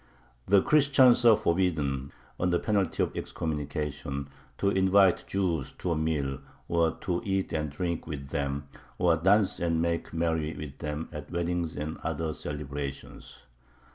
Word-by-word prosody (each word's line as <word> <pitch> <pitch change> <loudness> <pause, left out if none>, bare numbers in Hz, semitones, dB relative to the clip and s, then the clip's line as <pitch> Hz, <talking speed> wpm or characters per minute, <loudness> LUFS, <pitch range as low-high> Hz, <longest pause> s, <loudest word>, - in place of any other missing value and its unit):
The 100 0 +5
Christians 135 -4 +5
are 115 -3 +8
forbidden, 80 -9 0 0.3
under 90 -1 +2
penalty 100 0 +1
of - - -3
excommunication, 75 -2 -3 0.3
to 100 - +2
invite 95 -1 +4
Jews 90 -7 -1
to 90 - -3
a - - +2
meal, 75 -4 -1 0.3
or 85 -1 +2
to 90 -2 -1
eat 95 -2 -1
and 75 -1 -1
drink 85 +3 -3
with 70 -3 -6
them, 70 0 -2 0.3
or 85 -2 +4
dance 95 +5 +3
and 85 -1 +1
make 85 0 -1
merry 80 -1 -1
with 75 -2 -8
them 75 +1 -4
at 75 -2 -7
weddings 85 -1 -2
and 75 +2 -4
other 80 -1 -2
celebrations. 70 -2 -6
80 Hz, 140 wpm, -28 LUFS, 75-90 Hz, 0.3 s, are